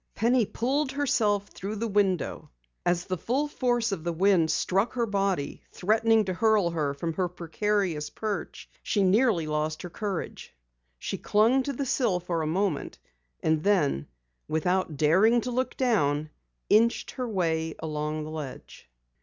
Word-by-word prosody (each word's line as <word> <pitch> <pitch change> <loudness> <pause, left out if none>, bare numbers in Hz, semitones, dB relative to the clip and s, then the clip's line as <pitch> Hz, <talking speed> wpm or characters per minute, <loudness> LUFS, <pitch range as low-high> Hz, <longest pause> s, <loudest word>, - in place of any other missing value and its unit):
Penny 235 0 +2
pulled 265 +3 -1
herself 220 -8 +1
through 200 +3 -6
the 230 +2 -2
window. 195 -5 0 0.4
As 175 0 +1
the 185 -3 -3
full 270 - 0
force 240 -5 0
of 180 -5 -3
the 170 - -1
wind 175 -1 +3
struck 195 +8 +1
her 240 -2 0
body, 195 -7 -1
threatening 220 +2 +2
to 185 - -2
hurl 210 -3 +3
her 150 -4 -1
from 165 +3 -3
her 185 +2 0
precarious 175 -2 -1
perch, 215 -2 -5
she 205 - +1
nearly 195 -3 +3
lost 155 0 -2
her 180 - -7
courage. 200 -3 -5 0.4
She - - -4
clung 225 +6 +3
to 280 +2 -3
the 275 +2 -3
sill 235 -8 +1
for 170 -2 -2
a 155 - -1
moment, 180 -1 -1 0.5
and 160 -1 +1
then 150 - +2 0.4
without 160 0 0
daring 190 - +4
to 250 - -4
look 255 +2 -2
down, 155 - +1 0.4
inched 230 +3 +3
her 250 -2 -4
way 165 -5 -1
along 155 0 -3
the 155 - -7
ledge. 145 - -8
195 Hz, 155 wpm, -27 LUFS, 160-225 Hz, 0.5 s, daring